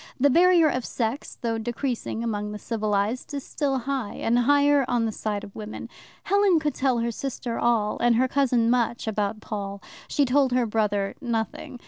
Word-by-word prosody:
The 285 +2 +4
barrier 345 +1 +5
of 255 -4 -1
sex, 235 +4 -3
though 230 -2 -1
decreasing 240 0 -3
among 210 -2 -3
the - - -5
civilized, 215 +4 -2
is 280 - -4
still 275 -3 -1
high, 260 -3 -3
and 235 +2 +1
higher 285 +2 +4
on 240 -2 +1
the 220 - -1
side 210 -1 -3
of 200 - -11
women. 215 0 -7 0.3
Helen 400 -3 +3
could 300 -2 -1
tell 260 -2 +1
her 235 0 0
sister 245 -1 -4
all, 225 -3 +1
and 240 0 +3
her 255 +3 +3
cousin 245 -4 +2
much 240 -1 0
about 215 0 -1
Paul; 200 -2 -5 0.3
she 285 - +2
told 265 0 +2
her 250 -1 +2
brother 210 -3 0
nothing. 235 0 -3
240 Hz, 180 wpm, -25 LUFS, 220-275 Hz, 0.3 s, barrier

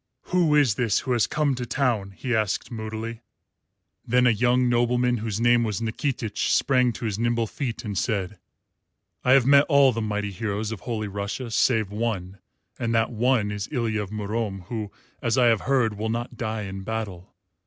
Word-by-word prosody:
"Who 170 -5 +4
is 140 -7 +4
this 110 -2 +1
who 130 - -4
has 120 -4 +2
come 150 -2 +1
to 125 -1 -4
town?" 115 -9 0
he 125 -3 -1
asked 110 +1 -1
moodily. 110 0 -5 0.8
Then 125 +1 +2
a 125 - +6
young 125 +3 +2
nobleman, 120 0 +2
whose 110 -1 -3
name 120 0 +4
was 105 -5 -2
Nikitich, 115 -1 -2
sprang 125 -2 +3
to 115 - -6
his 105 -1 -2
nimble 120 0 +1
feet 120 +1 -5
and 105 -2 -4
said, 100 -2 -2 0.8
"I 130 - +5
have 135 -3 +5
met 140 +1 +6
all 140 -3 +6
the 115 -1 -3
mighty 105 -1 -2
heroes 105 +2 -3
of 110 - -5
Holy 110 0 -3
Russia 100 +5 -4
save 110 -2 +2
one, 100 -4 -3 0.4
and 115 -1 0
that 115 +1 +2
one 115 -2 +1
is 105 0 -4
Ilya 115 -6 -1
of 100 - -6
Murom, 105 -1 -3
who, 110 -4 -4 0.3
I 120 - -1 0.2
have 115 -3 +4
heard, 120 -6 +1
will 110 +1 -2
not 120 +2 -3
die 110 -2 -3
in 95 0 -6
battle. 100 -4 -5
115 Hz, 185 wpm, -25 LUFS, 105-125 Hz, 0.8 s, a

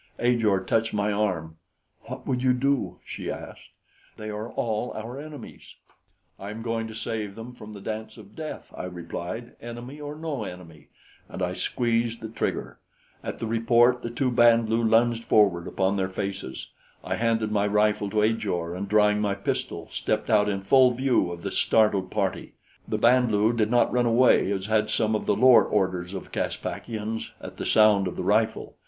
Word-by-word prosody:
Ajor 115 -6 +2
touched 110 +3 0
my 105 0 +1
arm. 90 -6 -1 0.5
"What - - -8
would 125 -2 -1
you 130 -1 +3
do?" 140 +1 0
she - - -6
asked. - - -8 0.5
"They 110 0 -6
are 105 +2 -5
all 115 0 -2
our 115 +5 -6
enemies." 150 -1 -10 0.6
"I 100 - -7
am 110 +2 -7
going 115 -1 -2
to 110 - -9
save 110 -3 -4
him 115 +2 -8
from 110 -3 -11
the 100 - -10
dance 110 +1 -6
of - - -14
death," - - -7
I - - -5
replied, 90 +6 -6
"enemy 120 +5 -8
or 145 0 -6
no 155 -6 -4
enemy," 85 -6 -10 0.4
and - - -5
I - - -1
squeezed 115 -1 -1
the 110 - -7
trigger. 110 - -3 0.4
At - - -5
the - - -4
report, 120 +2 +3
the 115 - -4
two 125 +2 -1
Band 115 -1 +5
lu 115 +1 +2
lunged 115 +1 +3
forward 95 -7 +3
upon 95 +1 0
their 95 -1 0
faces. 95 -7 -5 0.3
I - - -2
handed 115 -2 0
my 105 -1 +2
rifle 105 0 +2
to 105 +1 +1
Ajor, 100 -7 -1
and 95 +2 -5
drawing 105 0 +4
my 100 -2 0
pistol, 100 - -3
stepped 110 +2 -1
out 105 -1 +4
in 100 -1 -2
full 130 +5 +6
view 125 -8 +1
of 85 -1 -8
the - - -3
startled 105 -4 +2
party. 100 -2 -2 0.3
The - - -1
Band 125 0 +4
lu 105 +2 +3
did 110 -2 +1
not 120 0 +3
run 125 -1 +2
away 115 -4 +4
as 95 -1 -2
had 110 0 +1
some 110 0 +1
of 105 - -3
the - - +3
lower 130 -1 +7
orders 95 -2 -1
of 95 - -8
Caspakians 110 -1 -4
at - - -10
the - - -4
sound 105 -3 +5
of 90 - -5
the - - -4
rifle. - - +1
110 Hz, 185 wpm, -26 LUFS, 100-120 Hz, 0.6 s, lower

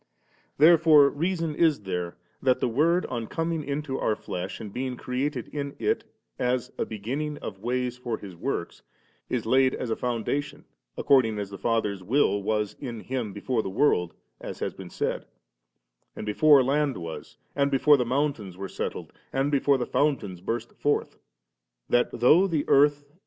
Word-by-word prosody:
Therefore 155 -2 +7
reason 165 0 -1
is 155 -5 +2
there 90 -3 -4 0.2
that 130 -1 +2
the - - +1
Word, 160 +9 +2
on 120 -3 -4
coming 165 +2 -2
into 140 -1 -3
our 110 - +1
flesh, 90 0 -5
and 105 -3 -8
being 125 -1 -3
created 130 0 -3
in 140 -1 -5
it 435 +1 0 0.4
as 125 0 0
' - - -36
a - - -1
beginning 135 +8 -4
of 95 - -7
ways 125 +2 -2
for 120 -3 -3
His 95 -3 -10
works,' - - -4 0.5
is - - -1
laid 130 0 +3
as 120 - -4
a - - +1
foundation 140 +5 -3 0.3
according 120 -6 +3
as 100 -1 -4
the 100 - -7
Father's 110 -4 0
willJ 105 0 +2
was 105 0 -1
in 120 -5 -6
Him 125 -4 -3
before 110 +4 -1
the 95 - -5
world, 90 - +1 0.2
as - - -7
has - - -3
been - - -10
said, - - -3 0.9
and - - -6
before 140 +6 +5
land 140 0 +1
was, 85 -2 -8 0.2
and 140 0 +2
before 140 +2 +5
the 130 - +1
mountains 125 -7 -1
were 95 0 -5
settled, - - -5 0.2
and 135 +2 0
before 140 -1 +3
the 125 - -2
fountains 105 -12 0
burst 115 +4 -3
forth; 145 - -1 0.7
that, 120 - +2
though 165 +10 +5
the 160 -5 -1
earth 145 +1 +4
and 170 - -32
130 Hz, 175 wpm, -26 LUFS, 110-145 Hz, 0.9 s, Therefore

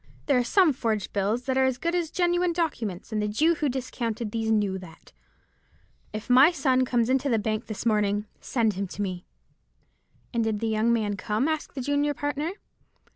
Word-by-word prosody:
There 275 -4 +3
are - - +2
some 335 - +4
forged 225 -5 -2
bills 205 +5 0
that 260 +1 0
are - - +4
as 260 -1 0
good 335 +6 -1
as 345 -3 0
genuine 350 0 +1
documents; 235 - -3
and 215 -1 0
the 210 - 0
Jew 305 +11 +3
who 300 -3 -1
discounted 235 -4 -3
these 225 0 -2
knew 205 -3 +1
that. 175 -3 -14 1.0
If 215 +1 -6
my 260 +5 +7
son 265 -6 +2
comes 240 -2 +1
into 265 +2 +1
the 230 - +3
bank 215 +1 -2
this 215 +1 -6
morning 210 -2 +1
send 225 -4 0
him 195 +1 -3
to 190 - -6
me.'" 180 -2 -5 1.1
"And 230 -1 +1
did 220 -2 -1
the 225 - -1
young 220 +1 +2
man 210 -3 0
come?" 215 +8 0
asked 315 -1 -3
the 265 - -3
junior 285 +2 0
partner. 290 +5 -2
235 Hz, 195 wpm, -26 LUFS, 210-285 Hz, 1.1 s, my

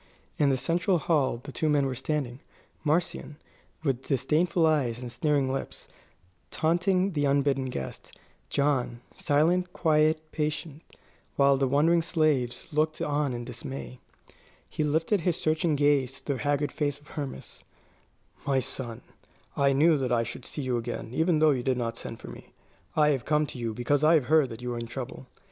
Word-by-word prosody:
In 145 - +4
the 135 - +2
central 175 +7 +1
hall 145 -7 +1
the 140 - -8
two 155 +3 0
men 145 -2 +3
were 135 - -1
standing; 130 -1 -3 0.4
Marcion, 155 -1 -1 0.5
with 135 -4 -1
disdainful 155 +6 +2
eyes 140 -7 +2
and 125 -1 -7
sneering 135 +1 +1
lips, 135 - -6 0.6
taunting 180 +4 +1
the 145 -2 +1
unbidden 140 -1 +2
guest; 70 - -7 0.3
John, 135 -4 0
silent, 175 +5 +1
quiet, 155 -1 +2
patient, 155 0 -3 0.5
while 140 0 +5
the 135 0 +1
wondering 160 +5 +3
slaves 150 -8 0
looked 155 +1 +1
on 145 -1 0
in 120 -1 -5
dismay. 125 +1 -7 0.7
He 155 - -2
lifted 160 +6 +1
his 175 0 0
searching 155 0 +1
gaze 140 -3 +2
to 140 - -2
the 130 - -5
haggard 145 0 0
face 145 -2 -2
of 145 - -20
Hermas. 145 -4 -7 0.8
"My 135 -1 +3
son, 125 -2 -5 0.5
I 140 0 +3
knew 150 +3 +4
that 130 -2 -1
I 115 -1 +3
should 120 +2 -7
see 145 - -5
you 125 -2 0
again, 115 -1 -5
even 160 +3 +2
though 155 0 +5
you 130 -3 0
did 130 0 0
not 115 -2 -2
send - - -8
for - - -11
me. - - -12 0.4
I 150 -1 +4
have 135 -4 0
come 150 0 +2
to 135 - -8
you 115 -1 -2
because 125 +6 0
I 160 +2 +6
have 150 -6 +2
heard 150 -1 +4
that 115 +1 -9
you 125 0 -2
are 120 - -4
in 115 - -5
trouble." 125 +2 -7
145 Hz, 175 wpm, -28 LUFS, 130-155 Hz, 0.8 s, I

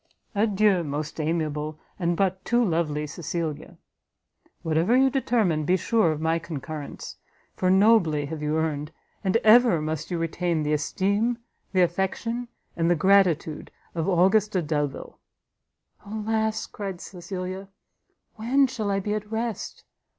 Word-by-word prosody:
Adieu, 205 -3 +2
most 150 +1 -4
amiable 155 -1 -2 0.2
and 170 -1 0
but 190 -1 0
too 240 0 +2
lovely 160 -4 0
Cecilia; 160 0 -5 0.9
whatever 165 +9 +2
you 265 0 +4
determine, 220 - +1
be 180 +5 +2
sure 215 -1 +2
of 155 - -3
my 160 +1 +1
concurrence, 155 -2 -7 0.4
for 185 - +1
nobly 190 -7 +4
have 155 +1 -6
you 150 +1 0
earned, 150 -1 -2 0.3
and 190 +2 +3
ever 225 -5 +6
must 155 0 -3
you 175 - -2
retain, 165 0 -1
the 150 0 0
esteem, 200 +10 0 0.3
the 185 - +3
affection, 195 +7 -1 0.3
and 165 0 +1
the 175 - +4
gratitude 170 -4 +2 0.2
of 165 0 -2
AUGUSTA 190 +1 +3
DELVILE. 145 -2 -3 0.8
"Alas," 220 +1 -1
cried 195 -4 -6
Cecilia, 185 +1 -6 0.7
"when 255 +6 +3
shall 240 -6 -3
I 195 0 +1
be 210 +2 -2
at 210 0 -4
rest? 225 -2 -4
180 Hz, 135 wpm, -25 LUFS, 155-210 Hz, 0.9 s, ever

